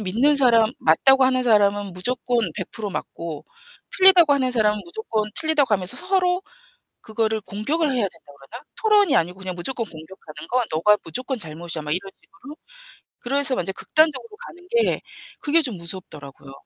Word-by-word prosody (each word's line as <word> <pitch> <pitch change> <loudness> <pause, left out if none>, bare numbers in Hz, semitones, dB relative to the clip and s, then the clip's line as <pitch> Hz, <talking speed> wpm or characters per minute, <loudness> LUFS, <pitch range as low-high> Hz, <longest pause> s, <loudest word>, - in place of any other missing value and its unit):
믿는 230 +10 +2
사람 235 -4 +3
맞다고 265 +12 +4
하는 255 0 +2
사람은 205 -4 +2
무조건 245 +5 -1 0.2
100% 215 -2 -5
맞고 165 -4 -7 0.5
틀리다고 365 -5 +7
하는 260 -2 +1
사람은 210 -3 +1
무조건 215 +4 -3
틀리다고 295 -8 +2
하면서 185 -1 -2
서로 365 -1 0 0.6
그거를 220 -1 -2
공격을 290 +13 -2
해야 250 -5 0
된다고 165 -6 -8
그러나? 235 - -12 0.2
토론이 415 -7 +3
아니고 180 +3 0
그냥 185 -2 -6
무조건 230 +6 -2
공격하는 160 -1 -12
건 250 +1 +1
"너가 210 +7 +3
무조건 255 - -4
잘못이야." 165 -2 -5
막 150 0 -6
이런 195 +4 -3
식으로. 290 +10 -14 0.6
그래서 275 +1 0
완전 180 +2 -2
극단적으로 315 - 0
가는 355 +1 -14
게 470 +2 +1 0.4
그게 315 +3 +3
좀 245 -9 -1
무섭더라고요. 150 -6 -8
220 Hz, 380 characters per minute, -22 LUFS, 180-280 Hz, 0.6 s, 틀리다고